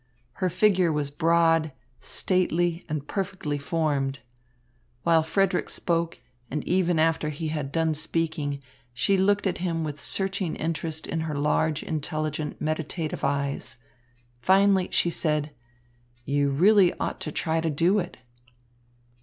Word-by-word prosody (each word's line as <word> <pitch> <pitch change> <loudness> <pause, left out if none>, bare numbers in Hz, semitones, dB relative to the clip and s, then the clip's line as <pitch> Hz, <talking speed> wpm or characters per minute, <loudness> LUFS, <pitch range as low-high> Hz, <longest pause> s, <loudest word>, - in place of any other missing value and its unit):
Her 185 - +2
figure 185 -2 +3
was 150 -2 -2
broad, 165 0 +3 0.3
stately, 175 -2 0
and 150 -1 -3
perfectly 185 -7 -3
formed. 140 -3 -1 0.9
While 165 -1 +4
Frederick 180 +3 +1
spoke, 170 -1 -1 0.3
and 150 - -4
even 180 -2 +2
after 160 -1 +2
he 155 +1 -4
had 150 -3 -3
done 160 +1 +1
speaking, 155 -2 -2 0.3
she 195 +10 +2
looked 200 +2 +2
at 190 - -1
him 170 -2 -1
with 150 -1 -5
searching 190 -2 +1
interest 160 -1 -2
in 165 - -2
her 160 -2 -3
large, 150 +1 +1
intelligent, 155 -1 -3
meditative 155 +1 -3
eyes. 140 -2 -1 0.6
Finally 190 +1 +4
she 170 - +2
said: 150 -2 0 0.7
"You 140 +1 +1
really 185 +6 +5
ought - - -2
to 155 - -3
try 160 +2 0
to 165 - 0
do 170 +7 +2
it." 180 -1 -5
160 Hz, 130 wpm, -26 LUFS, 150-175 Hz, 0.9 s, really